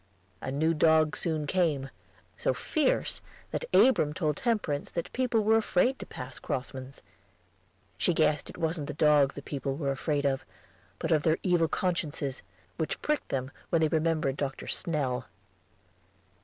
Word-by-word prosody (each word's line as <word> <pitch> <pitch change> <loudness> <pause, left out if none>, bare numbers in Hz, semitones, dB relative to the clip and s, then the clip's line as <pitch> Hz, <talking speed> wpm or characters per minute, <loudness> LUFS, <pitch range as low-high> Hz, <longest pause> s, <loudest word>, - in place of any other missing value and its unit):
A 130 - -4
new 160 +4 +2
dog 155 -1 +4
soon 155 -3 -1
came, 145 -5 0 0.4
so - - 0
fierce 300 -4 +1 0.3
that - - -2
Abram 155 - +4
told 155 -4 0
Temperance 200 - -1
that 170 - -4
people 245 -4 +1
were 220 +1 +5
afraid 225 +4 +2
to - - -8
pass - - -7
Crossman's. 130 +1 -5 1.0
She - - +4
guessed 155 -3 +1
it - - -10
wasn't 160 -3 -1
the 150 - -5
dog 150 -2 +4
the 140 - -7
people 140 -2 -3
were 140 -2 -1
afraid 145 +1 -1
of, 135 -1 +1 0.5
but 165 - -3
of 155 -2 +4
their 160 +1 +2
evil 175 -3 +3
consciences, 150 -6 -1 0.4
which 160 - -2
pricked 300 -1 0
them 130 0 -2 0.2
when 165 - +3
they 155 - +3
remembered 155 -3 +1
Dr. 135 -2 -3
Snell. 135 -6 0
155 Hz, 155 wpm, -29 LUFS, 140-170 Hz, 1.0 s, were